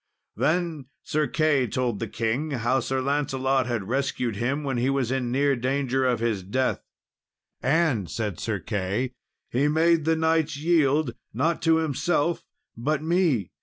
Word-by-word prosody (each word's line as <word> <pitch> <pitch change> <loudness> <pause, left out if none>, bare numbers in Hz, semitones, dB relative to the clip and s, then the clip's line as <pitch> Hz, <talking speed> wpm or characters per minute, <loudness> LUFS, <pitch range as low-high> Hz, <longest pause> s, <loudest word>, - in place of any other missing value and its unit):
Then 165 -4 0 0.2
Sir 150 -1 0
Key 145 -3 +2
told 120 -2 -1
the - - -3
King 115 +7 -1
how 130 -1 +1
Sir 130 +2 -1
Lancelot 135 -2 0
had 115 -6 -2
rescued 125 -2 -1
him 135 +7 -1
when 135 -3 -1
he 125 +3 +1
was 135 -3 0
in 130 -2 -1
near 140 +2 +2
danger 130 +1 0
of 120 -3 +1
his 115 -4 0
death; 130 +8 -1 0.8
"and," 135 - +1
said 105 -6 -3
Sir 110 -3 -1
Key, 105 +6 -2 0.4
"he 135 +4 +2
made 160 +1 +3
the 160 0 +3
knights 160 -2 +1
yield, 150 -4 +2 0.2
not 160 +7 +1
to 165 -1 +4
himself, 160 +1 0 0.3
but 145 +6 -1
me. 160 - +1
135 Hz, 155 wpm, -25 LUFS, 120-155 Hz, 0.8 s, to